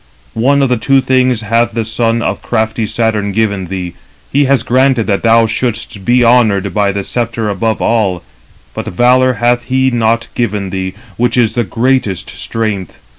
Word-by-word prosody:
One 140 +3 +3
of 125 -4 0
two 135 +3 +3
things 130 -3 +1
hath 115 +2 0
the 115 -1 -2
son 115 +1 0
of - - -2
crafty 110 -1 -1
Saturn 110 -2 -1
given 100 -3 -1
thee: 90 -1 -5 0.4
he 145 +1 +3
has 135 -3 +2
granted 130 -1 +2
that 100 -2 0
thou 115 0 +4
shouldst 115 -2 -3
be 120 +3 +3
honoured 105 -6 +3
by 100 0 +1
the 100 0 -3
sceptre 115 -1 -2
above 110 +3 -1
all; 100 -7 0 0.5
but - - -6
valour 125 +5 +3
hath 120 +1 0
he 130 +1 +1
not 115 -1 +1
given 105 -5 -2
thee, 95 0 -4 0.2
which 120 +1 0
is 115 -3 +2
the 120 - 0
greatest 115 -4 -1
strength. 105 -6 -4
115 Hz, 170 wpm, -13 LUFS, 105-125 Hz, 0.5 s, thou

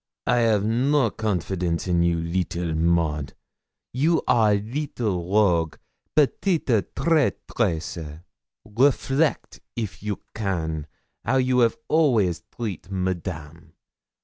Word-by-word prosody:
'I 125 - +2
have 110 -4 +3
no 125 +2 +2
confidence 90 -4 -2
in 85 -1 +2
you, 85 0 +2
little 85 0 -2
Maud; 80 -3 0 0.6
you 155 +6 +2
are 110 -3 +4
little 105 - -3
rogue 85 -7 +3 0.4
petite 155 +4 +2 0.3
traîtresse! 90 - -1 0.4
Reflect, 135 +6 +1 0.2
if 110 -5 -5
you 105 -1 -3
can, 80 -7 -2 0.4
how 130 +4 +1
you 130 -1 +3
'av 115 -2 +3
always 115 - +2
treat 105 -7 -5
Madame. 85 -4 -4
100 Hz, 100 wpm, -24 LUFS, 85-125 Hz, 0.6 s, are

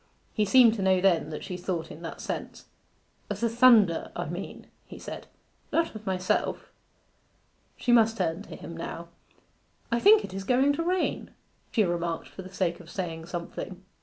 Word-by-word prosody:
He 210 - +1
seemed 235 +2 +6
to 220 - -4
know 190 -1 +3
that 165 -5 +1
she 180 - -5
thought 175 -3 -4
in 155 - -10
that 165 - -7
sense. - - -5 0.6
'Of 205 -1 -3
the 230 - +2
thunder, 230 -7 +5
I 175 - -3
mean,' 175 +4 -7 0.2
he - - -10
said; - - -8 0.4
'not 330 0 +1
of 215 -1 -10
myself.' 185 -1 -1 1.1
She 245 - 0
must 225 -1 +5
turn 165 0 -1
to - - -10
him 165 +2 -9
now. 170 0 -6 0.8
'I 235 - +2
think 415 - +6
it 190 - -11
is 195 0 -4
going 260 +6 +3
to 285 - -2
rain,' 365 +1 -1 0.4
she 220 - +3
remarked 170 -2 -2
for - - -9
the 185 - -10
sake 175 -3 -1
of 170 -2 -13
saying 165 -3 -5
something. 175 +2 -6
190 Hz, 175 wpm, -27 LUFS, 170-230 Hz, 1.1 s, seemed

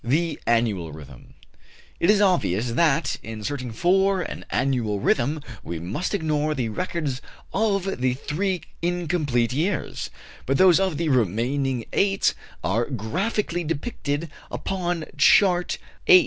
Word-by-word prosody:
THE 155 +5 0
ANNUAL 105 -9 +1
RHYTHM. 70 -4 -12 0.6
It 170 - +2
is 210 -1 +5
obvious 125 - +2
that, 145 +2 +2
in 110 -1 -7
searching 125 0 -3
for 190 - +2
an - - -7
annual 120 -5 0
rhythm, 140 +9 +1 0.2
we 85 - -5
must 100 - -2
ignore 155 -3 0
the 125 -5 -1
records 145 - -3 0.3
of 195 - 0
the 130 -1 +2
three 185 +7 -2 0.2
incomplete 160 -9 0
years; 170 +9 -1 0.4
but 135 +1 +2
those 185 -2 +6
of 190 -6 0
the 165 -1 0
remaining 125 +2 +1
eight 195 -1 +2 0.3
are 110 +6 +1
graphically 175 - -2
depicted 155 -2 -3 0.2
upon 175 -4 -2
Chart 180 +3 +5 0.3
8. 375 -3 +10
150 Hz, 130 wpm, -24 LUFS, 120-180 Hz, 0.6 s, 8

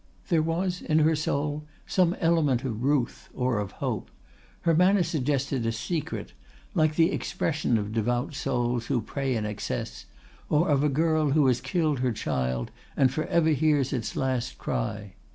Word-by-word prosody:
There 165 -4 +4
was 175 +3 -1
in 155 - +1
her 160 +1 +4
soul 150 0 -2 0.2
some 180 -1 +2
element 155 -7 +2
of 115 -3 -3
ruth 135 -2 0
or 125 -3 0
of 100 -2 -4
hope; - - -3 0.5
her 170 - +3
manner 180 +3 +4
suggested 140 -5 -1
a 115 - +1
secret, 155 +7 -4 0.4
like 155 -4 +2
the 165 +1 +4
expression 145 -7 0
of 105 0 -3
devout 120 +5 0
souls 120 -3 -1
who 135 -4 +1
pray 130 +3 -2
in 110 -2 -1
excess, 105 - -4 0.4
or 155 +3 +3
of 145 -1 +3
a 150 - +3
girl 155 0 +2
who 150 -2 +4
has 125 -2 +2
killed 155 -7 0
her 125 -1 +1
child 65 - -2 0.3
and 130 -1 +4
for 155 - -1
ever 165 -2 +2
hears 150 -2 +2
its 120 -5 -3
last 130 -2 -1
cry. 105 -4 -3
140 Hz, 170 wpm, -27 LUFS, 120-155 Hz, 0.5 s, There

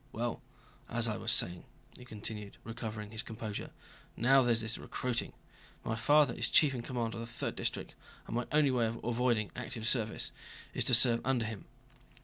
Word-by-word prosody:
Well, - - -3 0.5
as 115 0 0
I 110 - -1
was 110 - +1
saying," 90 -4 +3 0.3
he 125 - -11
continued, 105 -2 -6
recovering 110 -2 -6
his 110 0 -3
composure, 110 -3 -5 0.5
"now 135 +3 +6
there's 120 -2 +2
this 110 0 -2
recruiting. 125 -2 -2 0.5
My 110 - 0
father 145 +3 +4
is - - -2
chief 145 -3 +5
in 125 - -3
command 115 -2 -2
of - - -5
the 115 - -5
Third 115 - -4
District, - - -3 0.3
and - - -5
my 120 0 -1
only 150 -2 +4
way 120 -3 +2
of 115 +1 -4
avoiding 120 -2 +1
active 120 -3 -4
service 110 -3 0 0.4
is - - 0
to 125 - +6
serve 120 0 +6
under 125 -3 +1
him." 110 -2 -6
115 Hz, 180 wpm, -33 LUFS, 110-125 Hz, 0.5 s, now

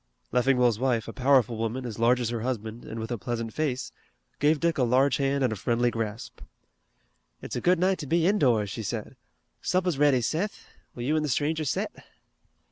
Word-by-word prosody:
Leffingwell's 125 -2 +3
wife, 125 -3 0
a 115 - -6
powerful 125 -4 +3
woman, 115 +3 -3
as 115 -2 -6
large 120 +2 +4
as 120 -2 -1
her 120 -2 -3
husband, 115 -2 -4
and 115 - -6
with 110 +2 -5
a 120 - -2
pleasant 115 -1 -4
face, 140 -5 -2 0.5
gave 150 +1 +3
Dick 170 -2 0
a - - +4
large 130 +3 +3
hand 140 0 +1
and 125 -4 +1
a - - -4
friendly 120 +4 +1
grasp. 115 -1 -5 1.0
"It's - - -5
a - - -2
good 180 +1 +4
night 185 +1 +1
to 150 - -6
be 165 +3 +2
indoors," 125 - +2
she 115 - -4
said. 105 - -5 0.5
"Supper's 180 -5 0
ready, 145 -4 +4
Seth. 170 - -2 0.3
Will 120 - -5
you 150 +5 +1
an' 155 - +2
the 150 - -2
stranger 155 +4 0
set?" 130 - -1
125 Hz, 200 wpm, -27 LUFS, 115-150 Hz, 1.0 s, large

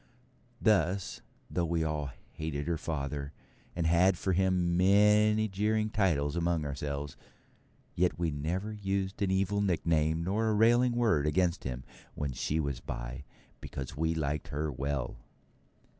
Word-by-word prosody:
Thus, 95 -3 +1 0.3
though 85 -2 -1
we 85 0 0
all 75 -3 -2 0.2
hated 75 -2 -4
her 85 -1 -1
father, 70 -2 -4 0.4
and 85 -1 -1
had 85 +3 +4
for 95 - 0
him 90 -1 +2
many 105 +3 +4
jeering 105 +2 0
titles 80 -9 +1
among 85 -2 0
ourselves; 70 0 -4 0.8
yet 85 -4 +1
we 85 -2 0
never 85 +9 -2
used 100 -1 -2
an 100 - +2
evil 95 +2 +1
nickname 80 -4 +1
nor 105 +5 0
a 110 - +2
railing 120 +3 +4
word 105 -12 +2
against 85 +3 +1
him 65 -1 -4 0.3
when 75 -2 -2
she 75 +5 -1
was 70 -5 -2
by, - - -6 0.3
because 65 -2 -6
we 80 +2 0
liked 75 -2 -2
her 75 +1 -2
well. 70 0 -3
85 Hz, 145 wpm, -31 LUFS, 75-95 Hz, 0.8 s, had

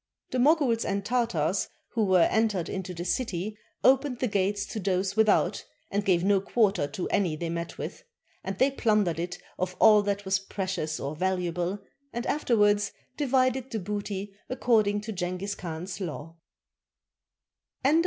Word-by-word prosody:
The 255 - 0
Moguls 270 -4 +3
and 200 0 -2
Tartars 210 -8 +1 0.2
who 225 - 0
were 185 -3 +5
entered 215 -5 +1
into 190 -1 -4
the 175 0 -5
city 200 0 -2 0.3
opened 265 0 +4
the 250 - 0
gates 200 0 0
to 220 - -3
those 190 0 0
without, 220 -1 +3 0.3
and 205 +1 0
gave 180 -3 +2
no 195 0 +3
quarter 200 -7 +2
to 160 +5 -4
any 180 -6 +1
they 165 +2 -4
met 170 0 -4
with; - - -6 0.4
and 190 0 -4
they 265 +5 +4
plundered 210 - +1
it 175 +1 -3 0.2
of 185 0 -2
all 215 -1 +7
that 200 0 -2
was 195 0 +2
precious 190 -5 -3
or 140 +3 -4
valuable 180 +1 -1 0.4
and 240 +1 -3
afterwards 210 -7 +2 0.2
divided 260 -2 +1
the 225 - -3
booty 205 0 -4 0.2
according 215 -5 +2
to 215 +1 -5
Jenghiz 185 +2 -3
Khan's 175 +3 -6
law. 165 -2 -5
200 Hz, 155 wpm, -28 LUFS, 180-220 Hz, 0.4 s, all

